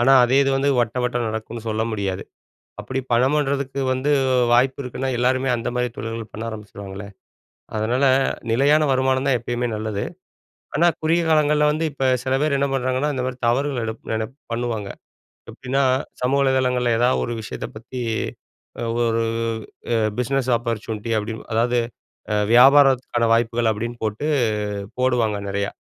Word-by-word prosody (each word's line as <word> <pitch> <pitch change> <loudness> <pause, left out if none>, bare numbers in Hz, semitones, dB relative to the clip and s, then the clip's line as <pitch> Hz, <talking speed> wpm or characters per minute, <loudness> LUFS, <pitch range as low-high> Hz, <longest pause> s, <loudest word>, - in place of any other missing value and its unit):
ஆனா, 130 +3 +5
அதே 130 +3 +2
இது 135 - +1
வந்து 140 +1 +1
வட்ட, 115 +1 -1
வட்ட 125 0 -1
நடக்குன்னு 110 +1 -5
சொல்ல 110 0 0
முடியாது. 100 -3 -2 0.6
அப்படி 130 0 -3
பணம் 130 +5 +3
பன்றதுக்கு 140 -1 -1
வந்து 130 +3 -1 0.2
அ - - +4 0.2
வாய்ப்பு 130 +3 +3
இருக்குன்னா, 130 +1 -4
எல்லாருமே 130 +2 +1
அந்த 115 - -3
மாதிரி 125 -1 0
தொழில்கள 115 -1 -5
பண்ண 110 - -5
ஆரம்பிச்சுருவாங்களே! 100 -2 -8 0.7
அதுனால, 120 +6 +1 0.5
நிலையான 145 +6 +4
வருமானம் 130 +1 +1
தான் 125 - +3
எப்பயுமே 120 +1 -2
நல்லது, 105 -1 -3 0.7
ஆனா 170 - +4 0.2
குறுகிய 165 +2 +2
காலங்கள்ல 150 -1 +3
வந்து 155 +2 -1
இப்ப 135 -1 -3 0.2
சில 130 0 0
பேர் 150 -2 +2
என்ன 140 - +2
பண்றாங்கன்னா, 130 +3 0
இந்த 130 - -2
மாதிரி 130 -1 -5
தவறுகள் 135 0 0
எடுப் 110 0 -6
நெனப் 110 +3 -3 0.2
பண்ணுவாங்க. 115 -4 -2 0.6
எப்படின்னா, 135 +1 -1 0.4
சமூக 135 +3 +2
வலைதளங்கள்ல 125 -2 +2
ஏதாவது 125 +1 +2
ஒரு 120 - -3
விஷயத்த 110 - -6
பத்தி 125 +3 -7 1.1
“ஒரு 115 0 +1 0.7
எ - - +3 0.2
பிஸ்னஸ் 130 +1 0
ஆப்பர்ச்சுனிட்டி,” 115 -1 -4
அப்டின்னு, 110 +1 -6
அதாவது 120 +2 +2 0.6
அ 105 - +2 0.2
வியாபாரத்துக்கான 130 -2 +5
வாய்ப்புகள் 115 0 +2
அப்புடின்னு 115 +2 -4
போட்டு 110 +7 -2 0.7
போடுவாங்க, 120 -5 +1
நெறையா. 100 +1 -1
125 Hz, 145 wpm, -22 LUFS, 115-135 Hz, 1.1 s, ஆனா